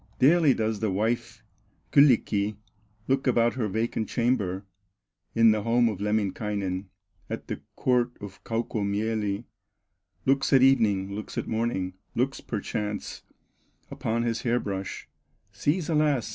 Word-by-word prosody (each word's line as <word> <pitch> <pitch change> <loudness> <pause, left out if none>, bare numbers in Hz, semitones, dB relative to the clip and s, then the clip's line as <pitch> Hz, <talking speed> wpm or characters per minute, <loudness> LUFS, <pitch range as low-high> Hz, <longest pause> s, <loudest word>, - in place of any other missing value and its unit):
Daily 150 0 +5
does 110 -1 -1
the 110 - 0
wife 110 +3 -1 0.5
Kyllikki 110 -7 +4 0.5
Look 135 +1 +1
about 120 -1 +3
her 120 -4 -1
vacant 110 +2 -2
chamber, 105 -6 0 0.7
In 115 -1 +6
the 110 -1 +1
home 120 +2 +3
of 105 -4 -5
Lemminkainen, 100 -2 -1 0.4
At - - -5
the - - -5
court 125 -1 +1
of 100 -2 -10
Kaukomieli; 110 -1 -1 0.8
Looks 135 +1 +2
at 130 -1 +7
evening, 100 -7 +3
looks 105 +1 -6
at - - -2
morning, 110 -5 -1 0.2
Looks, 135 +3 0
perchance, 105 -1 -4 0.7
upon 115 +1 -1
his 115 -1 -1
hair 120 0 +1
brush, 100 -3 -5 0.4
Sees 150 - 0
alas! 150 -7 +2
110 Hz, 125 wpm, -27 LUFS, 105-125 Hz, 0.8 s, at